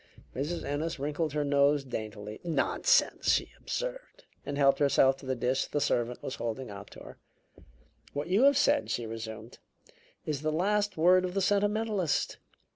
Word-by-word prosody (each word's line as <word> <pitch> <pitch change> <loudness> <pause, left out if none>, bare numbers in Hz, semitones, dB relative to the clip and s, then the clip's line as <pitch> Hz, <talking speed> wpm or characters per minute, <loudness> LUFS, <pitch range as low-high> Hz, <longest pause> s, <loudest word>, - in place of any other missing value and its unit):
Mrs. 150 +6 -3
Ennis 155 +3 -2
wrinkled 150 +2 -2
her 150 -1 0
nose 140 0 +3
daintily. 110 -4 -6
"Nonsense!" 175 - +2
she - - 0
observed, - - -5 0.2
and 145 - -4
helped 140 -1 +4
herself 135 -2 +4
to 135 - -12
the 130 - 0
dish 125 +2 0
the 145 - -1
servant 125 -4 -1
was 130 - -5
holding 120 0 -4
out 100 0 -9
to - - -12
her. - - -11 1.0
"What 145 +2 -3
you 200 +9 +4
have 280 -1 +5
said," 285 0 +2
she 120 - -2
resumed, 110 0 -8 0.7
"is 150 -3 -2
the 155 0 0
last 205 +4 0
word 180 +3 +5
of 180 0 -3
the - - +2
sentimentalist. 205 -3 0
145 Hz, 165 wpm, -29 LUFS, 130-185 Hz, 1.0 s, have